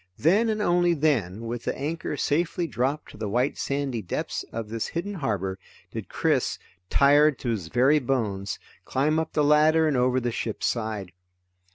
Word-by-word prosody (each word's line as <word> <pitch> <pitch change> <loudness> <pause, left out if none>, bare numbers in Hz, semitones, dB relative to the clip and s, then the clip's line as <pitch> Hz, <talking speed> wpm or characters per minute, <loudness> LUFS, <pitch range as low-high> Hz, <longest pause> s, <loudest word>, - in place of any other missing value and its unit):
Then, 205 - +3
and 215 -1 0
only 175 -2 +3
then, 120 - +1
with 115 +1 -5
the - - -2
anchor 150 +1 -3
safely 170 +5 0
dropped 140 0 -2
to - - -13
the 105 -1 -3
white 125 +6 +1
sandy 140 -4 -2
depths 90 - -3
of 115 -1 -4
this 115 0 -2
hidden 180 +5 -4
harbor, 100 - -2 0.3
did - - -6
Chris, - - +1 0.3
tired 145 +1 +5
to 125 - -4
his 105 -8 -2
very 130 - +4
bones, 105 -7 -2 0.3
climb 150 +4 +1
up 160 0 -3
the 150 - +2
ladder 155 +2 +5
and 150 - +1
over 125 +1 +2
the 120 -1 -2
ship's 110 -1 -3
side. 110 -5 -2
135 Hz, 175 wpm, -26 LUFS, 115-155 Hz, 0.3 s, tired